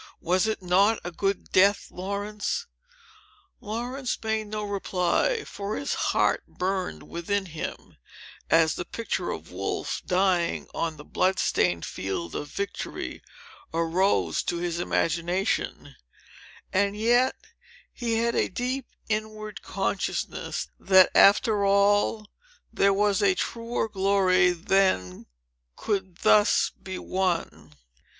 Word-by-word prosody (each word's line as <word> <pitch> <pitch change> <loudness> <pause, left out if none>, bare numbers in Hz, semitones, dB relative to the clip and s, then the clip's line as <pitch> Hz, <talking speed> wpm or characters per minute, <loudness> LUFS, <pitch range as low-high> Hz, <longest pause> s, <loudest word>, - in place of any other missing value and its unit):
"Was 185 +5 +2
it 215 -3 -2
not 195 +5 +3
a 175 - -5
good 195 +3 -2
death, 200 +2 +3
Laurence?" 205 - -3 0.9
Laurence 245 +4 -3
made 220 -1 -1
no 210 0 -4
reply; 200 - 0
for 205 - -5
his 280 - -2
heart - - +1
burned 185 - -3
within 190 +4 -2
him, 165 -3 -7 0.5
as 160 -2 +4
the - - -4
picture 230 +6 -3
of - - -6
Wolfe, - - -3
dying 180 -2 +1
on 165 -2 -2
the 150 - -10
blood 185 0 +1
stained 90 -2 +1
field 90 -4 -4
of 145 - -4
victory, 200 +5 -5 0.5
arose 165 - +1
to 175 - -2
his 170 0 -2
imagination; 175 +2 -1 0.8
and 200 +1 +1
yet, 240 +4 +3 0.6
he 235 -2 -2
had 235 +1 +1
a - - +1
deep 255 +1 -3 0.2
inward 215 -1 -4
consciousness, - - -3
that, 190 -1 +6
after 205 +1 +5
all, 205 +2 +3 0.5
there 200 - +4
was 205 +1 +2
a 195 -2 +4
truer 230 +2 -2
glory 190 -3 +3
than 180 - +1 0.5
could 190 -4 -3
thus 210 -1 +4
be 190 -1 -6
won. 170 - -2
195 Hz, 115 wpm, -26 LUFS, 175-215 Hz, 0.9 s, that